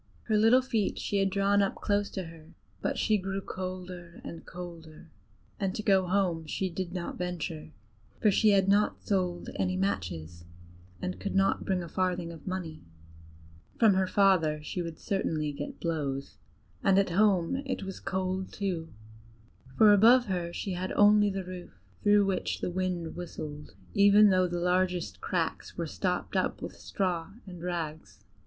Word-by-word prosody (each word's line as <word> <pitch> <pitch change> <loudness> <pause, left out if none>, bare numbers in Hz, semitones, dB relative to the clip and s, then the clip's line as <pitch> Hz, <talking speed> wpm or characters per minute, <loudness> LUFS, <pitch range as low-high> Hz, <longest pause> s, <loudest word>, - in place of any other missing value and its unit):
Her 220 - 0
little 225 +5 +5
feet 225 -6 -1
she 205 - -1
had 195 0 +2
drawn 200 +1 +2
close 205 -1 0
up - - -21
to 190 - -2
her, 165 0 -13 0.3
but - - -1
she 215 -1 +2
grew 195 +1 -3
colder 185 -2 -7
and 165 - -8
colder, 165 -3 -10 0.5
and 195 -2 -1
to 215 - -4
go 190 -3 +3
home 175 -4 0
she 190 +4 -2
did 175 0 -4
not 180 -1 -5
venture, 170 -3 -4 0.5
for 210 - +4
she 215 +2 +4
had 195 -2 +4
not 205 +1 +2
sold 180 -3 -1
any 185 0 0
matches 85 - -3 0.6
and 90 0 -3
could 95 - -4
not 195 0 +2
bring 185 -2 0
a - - -7
farthing 180 0 -1
of 165 0 -12
money: 180 -4 -4 1.0
from 220 -4 +6
her 190 0 +2
father 185 -6 +3
she 180 - -3
would 165 -2 -6
certainly 155 -6 -1
get 145 0 -7
blows, 140 -5 -3 0.4
and 195 -1 +4
at 195 -2 +3
home 195 +2 +3
it 265 -6 -3
was 195 0 -6
cold 190 0 -2
too, 180 -5 -3 0.9
for 215 -1 +8
above 235 +5 +6
her 180 -3 -2
she 195 - -4
had 185 +1 -3
only 205 0 +5
the 195 -1 -4
roof, 180 - -9 0.2
through 205 0 +5
which 195 -2 -1
the - - -2
wind 180 -2 -2
whistled, 150 - -7 0.2
even 205 +1 +6
though 185 -1 +3
the 175 0 -3
largest 180 0 0
cracks - - -2
were - - -1
stopped - - -2
up - - 0
with - - -6
straw 180 -2 -2
and 180 -3 -10
rags. 160 - -5
185 Hz, 165 wpm, -29 LUFS, 170-195 Hz, 1.0 s, for